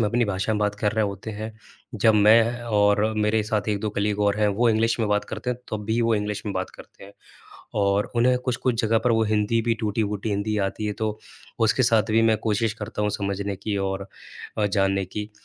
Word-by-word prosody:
में 105 - +2
अपनी 120 +1 +1
भाषा 100 +2 -1
में - - -1
बात 105 0 +1
कर 105 -1 +1
रहे 110 -1 +1
होते 100 +2 -5
हैं। 110 +1 -6 0.4
जब 110 +1 +4
मैं 115 +3 +4
और 105 -2 +3
मेरे 105 +1 +2
साथ 105 0 -1
1-2 105 0 -1
कलीग 105 0 -1
और 105 0 +2
हैं, 105 - +4
वो 115 +4 +2
इंग्लिश 115 +2 +1
में 110 - 0
बात 105 0 +1
करते 125 - -4
हैं 125 - -3
तब 105 -1 -4
भी 110 +2 0
वो 115 -1 +2
इंग्लिश 105 0 -2
में 100 - -2
बात 95 0 -3
करते - - -15
हैं, 100 - -14 0.6
और 100 0 +1
उन्हें 125 +2 +4
कुछ-कुछ 125 -2 -1
जगह 115 0 +3
पर 120 - +4
वो 110 0 +3
हिंदी 105 +2 +2
भी 115 0 +1
टूटी-फूटी 105 0 -2
हिंदी 100 +1 -1
आती 105 +2 -5
है 105 - -1
तो 110 0 -1 0.5
उसके 130 - +2
साथ 115 -3 +3
भी 115 +1 +4
मैं 110 -1 +4
कोशिश 105 +1 0
करता 105 0 -4
हूँ 105 - +1
समझने 100 0 -3
की 105 0 -3
और 95 0 -5 0.5
अ, 105 - +2
जानने 95 -1 +1
की। 105 +2 -6
105 Hz, 225 wpm, -24 LUFS, 105-110 Hz, 0.6 s, जब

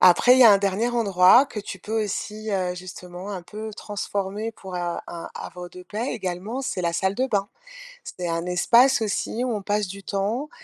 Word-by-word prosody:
Après 185 +7 +7
il - - +3
y - - +9
a 225 - +10
un 200 - +5
dernier 200 +4 0
endroit 225 +1 +5
que 215 -6 -6
tu 195 -2 -7
peux 220 +3 -2
aussi, 215 +2 -4
heu, 185 -3 0
justement 180 +1 -8
un 185 -3 -5
peu 215 +4 -7
transformer 205 +1 -4
pour, 190 -3 -10
heu, - - -2
un 175 -1 -2
un 170 -1 -7
havre 180 -1 -8
de 180 - -11
paix 215 +7 -4
également, 190 +8 -4
c'est 185 -8 -3
la 170 0 0
salle 190 +3 0
de 260 +4 0
bain. 205 -5 0 0.6
C'est 180 -1 -6
un 165 +1 -2
espace 235 +9 +4
aussi 220 +3 -1
où 250 -2 -1
on 205 - -3
passe 205 0 0
du 195 +2 -8
temps, 215 +9 -2
200 Hz, 215 wpm, -24 LUFS, 180-220 Hz, 0.6 s, a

